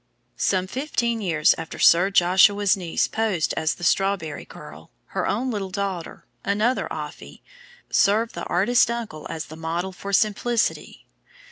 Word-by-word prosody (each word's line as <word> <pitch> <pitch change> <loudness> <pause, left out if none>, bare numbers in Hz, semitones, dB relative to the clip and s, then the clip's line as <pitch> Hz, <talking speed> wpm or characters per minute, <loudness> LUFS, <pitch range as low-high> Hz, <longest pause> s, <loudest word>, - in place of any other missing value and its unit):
] - - -46
Some 185 -1 0
fifteen 235 -1 -2
years 160 -5 +3
after 165 - -7
Sir 175 +3 +5
Joshua's 195 +2 +4
niece 175 -4 -1
posed 215 -7 -1
as 160 0 0
the - - -12
Strawberry 190 -4 0
Girl, - - -12 0.2
her - - -1
own 250 +5 -1
little 200 -4 -3
daughter, 190 -3 -5 0.2
another 215 +6 0
"Offy," - - -8 0.5
served 220 +3 +2
the 170 - -6
artist 225 +8 +3
uncle 230 -10 -5
as 160 - -5
the 155 - -11
model 165 +3 -3
for 195 +2 -7
Simplicity. 215 +3 0
195 Hz, 145 wpm, -23 LUFS, 175-220 Hz, 0.5 s, Sir